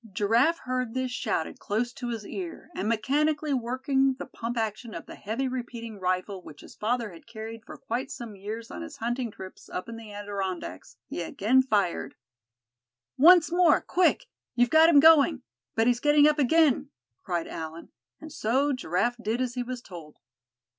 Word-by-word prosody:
Giraffe 230 Hz, -, +3 dB
heard 255 Hz, -3 st, -3 dB
this 260 Hz, -1 st, -1 dB
shouted 165 Hz, -9 st, -2 dB
close 240 Hz, +4 st, -2 dB
to 245 Hz, -, -6 dB
his 225 Hz, -3 st, -4 dB
ear, 345 Hz, -, -7 dB
and 210 Hz, -, -2 dB
mechanically 290 Hz, +6 st, +1 dB
working 265 Hz, +2 st, +1 dB
the -, -, -7 dB
pump 235 Hz, -1 st, -5 dB
action 220 Hz, +1 st, -3 dB
of -, -, -7 dB
the -, -, -10 dB
heavy 230 Hz, +6 st, -3 dB
repeating 235 Hz, -4 st, -6 dB
rifle 185 Hz, +1 st, -1 dB
which 150 Hz, -4 st, -13 dB
his -, -, -13 dB
father 230 Hz, 0 st, -1 dB
had 170 Hz, +4 st, -15 dB
carried 225 Hz, 0 st, -8 dB
for -, -, -10 dB
quite 260 Hz, +2 st, -3 dB
some 235 Hz, -6 st, -7 dB
years 215 Hz, +4 st, -7 dB
on -, -, -6 dB
his 315 Hz, -3 st, -8 dB
hunting 240 Hz, 0 st, -2 dB
trips 190 Hz, -2 st, -11 dB
up 180 Hz, -, -5 dB
in 230 Hz, 0 st, -7 dB
the 225 Hz, -2 st, -10 dB
Adirondacks, 195 Hz, -, -5 dB
he -, -, -5 dB
again 220 Hz, +9 st, +2 dB
fired. 205 Hz, -9 st, 0 dB, 1.0 s
"Once 335 Hz, +3 st, +7 dB
more, 350 Hz, -3 st, +5 dB
quick! 365 Hz, 0 st, +2 dB, 0.3 s
you've 245 Hz, 0 st, +3 dB
got 320 Hz, +1 st, +7 dB
him 300 Hz, -4 st, +7 dB
going; 305 Hz, -3 st, +6 dB, 0.3 s
but 225 Hz, -, +3 dB
he's 240 Hz, 0 st, +3 dB
getting 295 Hz, +2 st, +5 dB
up 300 Hz, 0 st, +2 dB
again!" 295 Hz, 0 st, +3 dB, 0.3 s
cried 175 Hz, -3 st, -2 dB
Allan, 160 Hz, +1 st, -7 dB, 0.3 s
and 310 Hz, -1 st, -10 dB
so 270 Hz, +6 st, +1 dB
Giraffe 240 Hz, 0 st, 0 dB
did 225 Hz, +2 st, -1 dB
as 255 Hz, -2 st, -1 dB
he 250 Hz, -, -2 dB
was 245 Hz, 0 st, -5 dB
told. 165 Hz, -5 st, -11 dB
240 Hz, 175 wpm, -27 LUFS, 210-270 Hz, 1.0 s, Once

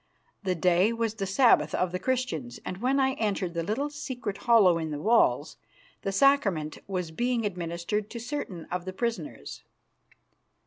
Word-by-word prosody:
The 185 Hz, -3 st, -1 dB
day 180 Hz, +5 st, +3 dB
was 230 Hz, -2 st, -1 dB
the 200 Hz, -3 st, -4 dB
Sabbath 235 Hz, +6 st, +4 dB
of 180 Hz, -1 st, 0 dB
the 180 Hz, -, -3 dB
Christians, 190 Hz, -, -2 dB
and 180 Hz, -, -4 dB
when 255 Hz, +6 st, +1 dB
I 265 Hz, 0 st, +2 dB
entered 195 Hz, -5 st, -1 dB
the 170 Hz, -, -1 dB
little 230 Hz, -, -2 dB
secret 260 Hz, -8 st, -5 dB
hollow 195 Hz, -8 st, +6 dB
in 160 Hz, -1 st, -3 dB
the 150 Hz, -, -3 dB
walls, 225 Hz, +9 st, +2 dB, 0.4 s
the 195 Hz, -, -2 dB
sacrament 195 Hz, -, +2 dB
was 180 Hz, -4 st, -3 dB
being 240 Hz, +5 st, 0 dB
administered 180 Hz, +2 st, -3 dB
to 235 Hz, -, -6 dB
certain 225 Hz, -, -5 dB
of 180 Hz, 0 st, -3 dB
the 185 Hz, -, -5 dB
prisoners. 235 Hz, +8 st, -4 dB
200 Hz, 165 wpm, -28 LUFS, 175-240 Hz, 0.4 s, hollow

